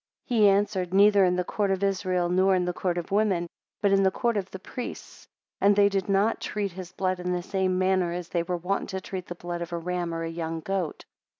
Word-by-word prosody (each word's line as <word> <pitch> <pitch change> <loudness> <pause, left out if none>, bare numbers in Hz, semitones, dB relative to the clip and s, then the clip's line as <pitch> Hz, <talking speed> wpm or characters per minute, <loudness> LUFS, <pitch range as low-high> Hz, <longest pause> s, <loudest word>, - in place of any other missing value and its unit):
He 220 -5 +4
answered, 195 -2 +1
Neither 200 0 +6
in 180 0 +2
the 180 - 0
court 200 +2 -1
of 195 0 0
Israel, 185 -2 +1
nor 185 +2 +3
in 180 -1 +1
the 180 - -1
court 175 -1 -1
of 175 0 -4
women, 200 -4 +2 0.4
but 200 - +4
in 195 0 +4
the 190 - +4
court 235 +4 -1
of 195 -2 -2
the - - -7
priests; 245 +6 -8 0.3
and 200 +1 +4
they 200 0 +5
did 195 -1 -2
not 200 +3 +2
treat 205 -2 -2
his 185 0 -8
blood 185 0 -1
in 180 0 -2
the 175 -1 -2
same 190 -1 0
manner 185 -2 +2
as 175 0 -5
they 170 - 0
were 175 +1 -2
wont 185 +4 -2
to 190 - -3
treat 185 -1 -6
the 175 - -6
blood 175 0 -5
of 170 0 -5
a - - -1
ram 175 0 -3
or 165 0 -3
young 165 0 -4
goat. 190 -3 -3
185 Hz, 240 wpm, -26 LUFS, 175-195 Hz, 0.4 s, Neither